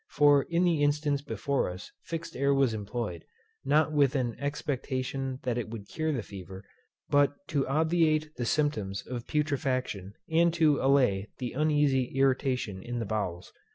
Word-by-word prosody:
For 145 -1 +5
in 170 +1 +2
the 170 -4 +2
instance 145 -1 +1
before 140 -3 -1
us; 90 +1 -8
fixed 165 0 -6
air 140 +1 +2
was 135 -4 +3
employed, 105 -5 -4 0.4
not 150 +3 +3
with 145 -2 +3
an 120 -4 0
expectation 135 -2 -3
that 125 -2 -1
it 115 - -4
would 110 -3 -8
cure 160 -1 -2
the 125 -7 -2
fever, 95 0 -10 0.5
but 145 0 +4
to 145 -5 0
obviate 155 +1 +2
the 120 - -3
symptoms 110 -10 -1
of 120 -2 -6
putrefaction, 130 -9 -1
and 165 +1 +3
to 155 -4 +3
allay 125 -8 +3
the 125 -2 -4
uneasy 145 -2 +2
irritation 130 -7 +1
in 120 +4 -5
the 115 - -2
bowels. 95 -4 -3
135 Hz, 155 wpm, -29 LUFS, 115-150 Hz, 0.5 s, For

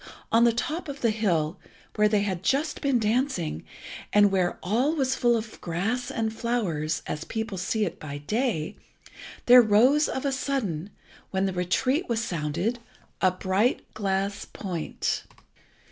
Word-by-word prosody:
on 230 +1 +5
the 235 - +5
top 310 +9 -3
of 280 0 -7
the 230 - +3
hill, 185 -6 0 0.4
where 210 0 +4
they 210 -1 +2
had 190 -4 -2
just 280 +10 0
been 275 -3 +2
dancing, 220 - 0 0.5
and 205 -1 +5
where 185 -2 +1
all 245 - +1
was 265 -3 +1
full 240 -2 +3
of 220 -1 -7
grass 220 +9 -2
and 220 -1 -2
flowers, 185 -11 -1
as 150 - -4
people 220 0 -4
see 200 +4 0
it 170 - -5
by 145 -1 -6
day, 175 - -1 0.7
there 250 +1 +9
rose 245 +8 +4
of 265 - -3
a 280 - +1
sudden, 225 - -2 0.4
when 190 0 0
the 190 - -1
retreat 255 - 0
was 230 -1 +1
sounded, 175 +4 -2 0.4
a 185 - +5
bright 190 +6 0
glass 200 -1 -1
point. 180 -6 -3
215 Hz, 155 wpm, -26 LUFS, 185-245 Hz, 0.7 s, there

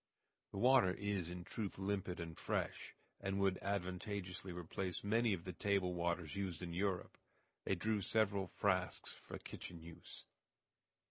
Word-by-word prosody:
The - - -6
water 120 -5 +6
is 100 -4 -1
in 90 0 -5
truth 100 +2 -3
limpid 95 -2 -1
and 85 -1 -4
fresh, - - -1 0.2
and 95 0 0
would 95 -1 +3
advantageously 95 -1 -2
replace 90 +1 -2
many 115 +3 +4
of 90 -4 0
the 90 - -4
table 95 +1 +2
waters 85 -1 0
used 95 -4 -2
in 85 -1 -3
Europe. 95 0 0 0.5
They 95 - +3
drew 105 +3 +1
several 100 -2 +3
frasques - - +1
for - - -7
kitchen 85 - -7
use. 85 0 -8
95 Hz, 145 wpm, -40 LUFS, 90-100 Hz, 0.5 s, water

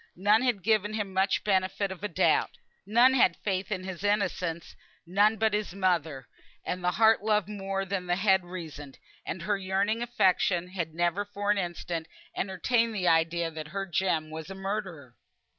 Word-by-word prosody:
None 205 +4 +3
had 245 -7 0
given 215 0 +1
him 205 -3 -3
much 190 +1 +1
benefit 190 0 0
of 190 +1 -9
a - - 0
doubt. - - +2 0.4
None 240 +5 +5
had 260 - +4
faith 195 0 -2
in 185 -3 -2
his 185 -1 -7
innocence. 185 -5 -1 0.3
None 205 +5 +3
but 220 0 +1
his 210 -3 -2
mother; 165 -8 0 0.4
and 180 0 -3
there 180 - +3
the - - -3
heart 220 -1 +5
loved 210 -3 +1
more 195 -2 -3
than 190 -1 -3
the 175 - +2
head 190 -1 +3
reasoned, 160 -6 -8 0.3
and 170 - -4
her 205 +1 0
yearning 195 +4 0
affection 185 -6 +1
had 170 -4 -4
never 175 +3 +1
for 205 0 -2
an 205 - +1
instant 170 -2 -4 0.3
entertained 225 +5 0
the 185 -3 -1
idea 165 0 +2
that 155 -1 -7
her 195 +5 -4
Jem 170 -3 -1
was 160 +1 -7
a 195 - -7
murderer. 190 - -5
190 Hz, 180 wpm, -28 LUFS, 175-210 Hz, 0.4 s, None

